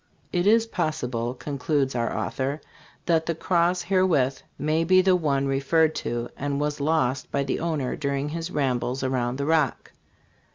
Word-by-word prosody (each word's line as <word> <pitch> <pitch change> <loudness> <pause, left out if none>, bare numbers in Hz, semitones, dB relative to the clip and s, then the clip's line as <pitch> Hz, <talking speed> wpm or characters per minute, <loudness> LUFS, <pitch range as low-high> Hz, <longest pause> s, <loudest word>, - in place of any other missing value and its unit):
It 175 +2 +1
is 225 +2 +5
possible," 125 - -2
concludes 140 0 -1
our 120 -1 -1
author, 135 +3 -2 0.2
" - - -28
that 165 -2 +2
the 165 - 0
cross 175 +1 +1
herewith 170 -8 +2 0.2
may 155 +3 +1
be 185 +3 +5
the 190 -1 +4
one 140 -5 +1
referred 140 +4 +2
to, 120 0 -3
and 140 0 -2
was 150 0 -1
lost 140 -4 0
by 140 - 0
the 135 - -2
owner 155 -6 -1
during 140 0 -2
his 165 +2 -4
rambles 130 -4 -1
around 130 -1 -1
the 140 - -2
Rock." 155 -4 +1
145 Hz, 165 wpm, -25 LUFS, 135-165 Hz, 0.2 s, is